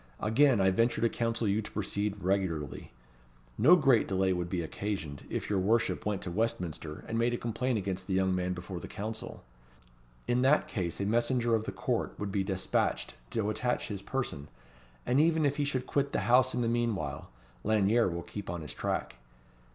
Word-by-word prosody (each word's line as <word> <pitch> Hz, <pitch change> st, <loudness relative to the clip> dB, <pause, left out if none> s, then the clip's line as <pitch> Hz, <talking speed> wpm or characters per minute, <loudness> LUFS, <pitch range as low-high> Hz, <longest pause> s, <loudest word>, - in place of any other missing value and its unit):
Again 125 Hz, +3 st, +4 dB
I 95 Hz, 0 st, +4 dB
venture 115 Hz, +5 st, +2 dB
to 115 Hz, -, +4 dB
counsel 115 Hz, -1 st, -1 dB
you 100 Hz, +2 st, +2 dB
to 105 Hz, -, -8 dB
proceed 100 Hz, -1 st, -2 dB
regularly. 90 Hz, -7 st, -1 dB, 0.6 s
No 150 Hz, +11 st, +7 dB
great 135 Hz, -9 st, +4 dB
delay 95 Hz, -1 st, +2 dB
would 90 Hz, -1 st, -2 dB
be 85 Hz, -1 st, -1 dB
occasioned, 80 Hz, -5 st, -4 dB
if -, -, -3 dB
your 100 Hz, -2 st, +1 dB
worship 110 Hz, +3 st, +1 dB
went 105 Hz, -3 st, -1 dB
to 90 Hz, -, -4 dB
Westminster, 85 Hz, -7 st, -2 dB
and 115 Hz, -, -1 dB
made 120 Hz, +1 st, +2 dB
a -, -, -3 dB
complaint 120 Hz, +1 st, -1 dB
against 95 Hz, -2 st, -3 dB
the 95 Hz, -, 0 dB
young 95 Hz, 0 st, +2 dB
man 90 Hz, 0 st, 0 dB
before 90 Hz, 0 st, -6 dB
the -, -, -8 dB
Council. 110 Hz, +1 st, -6 dB, 0.8 s
In 120 Hz, +1 st, +2 dB
that 135 Hz, +4 st, +4 dB
case 90 Hz, -5 st, -3 dB
a 100 Hz, -, 0 dB
messenger 120 Hz, +2 st, +2 dB
of 110 Hz, -1 st, +1 dB
the -, -, -3 dB
Court -, -, -2 dB
would 105 Hz, -1 st, -3 dB
be 95 Hz, 0 st, +1 dB
despatched 95 Hz, -1 st, -1 dB, 0.2 s
to 105 Hz, -2 st, -1 dB
attach 125 Hz, +3 st, -1 dB
his 100 Hz, -2 st, -4 dB
person; 110 Hz, -, -3 dB, 0.6 s
and 125 Hz, +3 st, +3 dB
even 160 Hz, -1 st, +3 dB
if 145 Hz, 0 st, +1 dB
he 145 Hz, -, +1 dB
should 130 Hz, -3 st, -2 dB
quit 140 Hz, +2 st, 0 dB
the -, -, +1 dB
house 125 Hz, +5 st, +4 dB
in 125 Hz, -, 0 dB
the -, -, +1 dB
meanwhile, 115 Hz, -12 st, -1 dB, 0.3 s
Lanyere 110 Hz, +1 st, +3 dB
will 85 Hz, 0 st, -4 dB
keep 100 Hz, -3 st, -7 dB
on 85 Hz, -1 st, -3 dB
his 75 Hz, -, -6 dB
track. -, -, -3 dB
105 Hz, 195 wpm, -30 LUFS, 95-120 Hz, 0.8 s, No